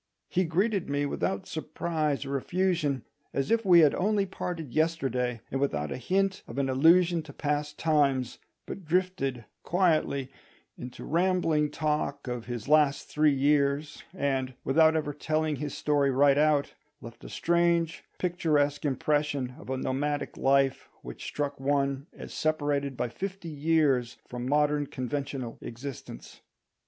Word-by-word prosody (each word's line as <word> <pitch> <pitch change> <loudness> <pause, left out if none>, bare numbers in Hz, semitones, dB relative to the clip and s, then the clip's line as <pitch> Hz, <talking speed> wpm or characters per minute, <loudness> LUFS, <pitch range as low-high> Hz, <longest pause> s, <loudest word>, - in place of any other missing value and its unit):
He 185 0 +1
greeted 190 +3 0
me 145 0 0
without 95 -8 -2
surprise 155 -2 -2
or 140 +1 -3
effusion, 160 -3 0 0.3
as 135 +6 -1
if 230 0 +3
we 175 -4 +7
had 150 -3 +5
only 205 +1 +1
parted 175 -7 -5
yesterday, 130 -7 0
and 135 - -1
without 75 - -1
a - - -3
hint 190 +8 0
of - - -9
an 135 -1 0
allusion 165 +5 +4
to 155 -2 -11
past 150 +1 -2
times, 140 -6 +1 0.3
but 195 - -7
drifted 160 - -1 0.2
quietly 155 -7 +1 0.4
into 125 0 -9
rambling 165 -3 +2
talk 150 -3 -2
of 125 -2 -4
his 120 -2 -5
last 150 -2 +3
three 150 0 +3
years, 140 +1 +1
and, 135 -7 -1
without 160 +3 +4
ever 150 -2 -1
telling 155 0 -1
his 145 +1 -5
story 145 -2 +2
right 140 +1 +4
out, 150 -2 +2 0.3
left 115 -3 -12
a - - -9
strange 170 -2 +1
picturesque 155 -5 +1
impression 145 -2 0
of - - -12
a 130 - -1
nomadic 145 +3 -2
life 135 0 +2
which 60 -1 -8
struck 145 -1 -3
one 140 +1 0
as - - -10
separated 145 -3 -1
by - - 0
fifty 190 +6 -6
years 145 -5 +1
from 125 +1 -5
modern 150 0 +2
conventional 130 -1 -4
existence. 120 - -8
145 Hz, 145 wpm, -28 LUFS, 135-160 Hz, 0.4 s, we